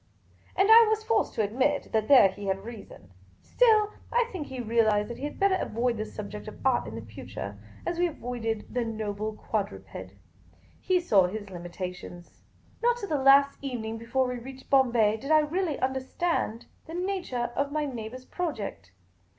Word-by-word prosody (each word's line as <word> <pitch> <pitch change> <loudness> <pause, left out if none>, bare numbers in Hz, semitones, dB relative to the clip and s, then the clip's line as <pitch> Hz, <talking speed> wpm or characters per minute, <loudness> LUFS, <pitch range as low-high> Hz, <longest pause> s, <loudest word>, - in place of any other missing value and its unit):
And 385 +1 +4
I 455 0 +9
was 435 0 0
forced 440 -1 +1
to 220 - +1
admit 265 +7 0
that 220 -1 +1
there 255 -8 +8
he 200 +1 -8
had 195 0 -1
reason. 210 - -11 0.3
Still, 430 -4 +4 0.2
I 480 0 +2
think 340 -7 -5
he 260 -1 -7
realised 220 -2 +2
that 235 - -7
he 280 - -4
had 295 - -6
better 395 -1 +4
avoid 235 +1 -1
the 215 - -2
sub 210 -2 -7
ject 210 +1 -8
of 215 - -8
art 260 - +2
in 110 +2 -6
future, 105 -1 -8 0.3
as 345 0 -2
we 355 - +3
avoided 235 -7 -4
the 245 -1 0
noble 215 -1 -3
quadruped. 210 -1 -5 0.7
He 370 -1 +2
saw 200 - +4
his 205 +1 -6
limitations. 175 0 -8 0.4
Not 480 0 +3
till 405 -5 -6
the 295 -3 0
last 275 +1 +6
evening 225 -5 -4
before 245 +3 0
we 250 -1 -4
reached 265 +2 -11
Bombay 235 -6 +4
did 275 +6 -8
I 310 - +6
really 320 0 -1
understand 265 -1 -1 0.2
the 325 - -7
nature 355 -11 -2
of 280 0 0
my 305 0 0
neighbour's 250 -1 -6
project. 215 - -5
245 Hz, 175 wpm, -28 LUFS, 215-300 Hz, 0.7 s, I